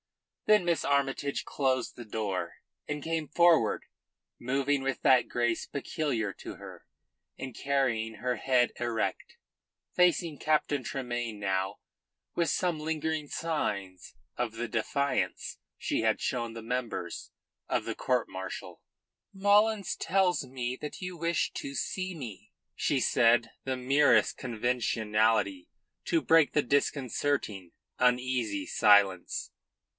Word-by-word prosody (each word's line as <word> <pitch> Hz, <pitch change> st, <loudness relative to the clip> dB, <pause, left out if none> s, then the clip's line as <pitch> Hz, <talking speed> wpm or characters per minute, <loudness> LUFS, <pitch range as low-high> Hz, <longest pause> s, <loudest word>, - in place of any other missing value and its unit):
Then 210 Hz, -4 st, +5 dB
Miss 170 Hz, -1 st, +1 dB
Armytage 140 Hz, 0 st, 0 dB
closed 130 Hz, -3 st, 0 dB
the 120 Hz, -, -8 dB
door 100 Hz, -5 st, -3 dB, 0.3 s
and 150 Hz, -1 st, -4 dB
came 160 Hz, -2 st, -2 dB
forward, 165 Hz, -10 st, +4 dB, 0.5 s
moving 135 Hz, +3 st, 0 dB
with 135 Hz, -1 st, -2 dB
that 130 Hz, -2 st, +5 dB
grace 120 Hz, -1 st, 0 dB
peculiar 135 Hz, -7 st, -2 dB
to -, -, -9 dB
her, -, -, -11 dB, 0.5 s
and 130 Hz, -3 st, -7 dB
carrying 120 Hz, -6 st, 0 dB
her 125 Hz, +4 st, -1 dB
head 125 Hz, -2 st, +2 dB
erect, 120 Hz, -2 st, -2 dB, 0.6 s
facing 170 Hz, -3 st, +3 dB
Captain 150 Hz, -3 st, +1 dB
Tremayne 120 Hz, -4 st, -3 dB
now 95 Hz, 0 st, -1 dB, 0.6 s
with 170 Hz, -2 st, +1 dB
some 175 Hz, 0 st, 0 dB
lingering 155 Hz, -1 st, -2 dB
signs 100 Hz, -, -3 dB, 0.2 s
of 120 Hz, -2 st, -2 dB
the 115 Hz, +1 st, -3 dB
defiance 140 Hz, +6 st, -1 dB, 0.2 s
she -, -, -1 dB
had 110 Hz, -1 st, +2 dB
shown 120 Hz, -2 st, -2 dB
the 115 Hz, -1 st, -8 dB
members 125 Hz, 0 st, -4 dB, 0.4 s
of -, -, 0 dB
the -, -, -3 dB
court 125 Hz, -2 st, 0 dB
martial. 95 Hz, -1 st, -7 dB, 0.5 s
"Mullins 205 Hz, +1 st, +3 dB
tells 185 Hz, -2 st, +1 dB
me 125 Hz, -1 st, -3 dB
that 150 Hz, -, -6 dB
you 180 Hz, -1 st, -5 dB
wish 170 Hz, 0 st, 0 dB
to 140 Hz, -, -5 dB
see 185 Hz, -, -2 dB
me," 120 Hz, -, -9 dB, 0.2 s
she -, -, +1 dB
said 115 Hz, 0 st, +3 dB
the 130 Hz, -1 st, -2 dB
merest 140 Hz, +3 st, +4 dB
conventionality 110 Hz, -5 st, 0 dB, 0.4 s
to 165 Hz, -, +2 dB
break 165 Hz, -2 st, +5 dB
the 150 Hz, -, +3 dB
disconcerting, 130 Hz, -, 0 dB, 0.3 s
uneasy 125 Hz, -5 st, +1 dB
silence. 100 Hz, -4 st, +3 dB
130 Hz, 120 wpm, -30 LUFS, 115-150 Hz, 0.6 s, Then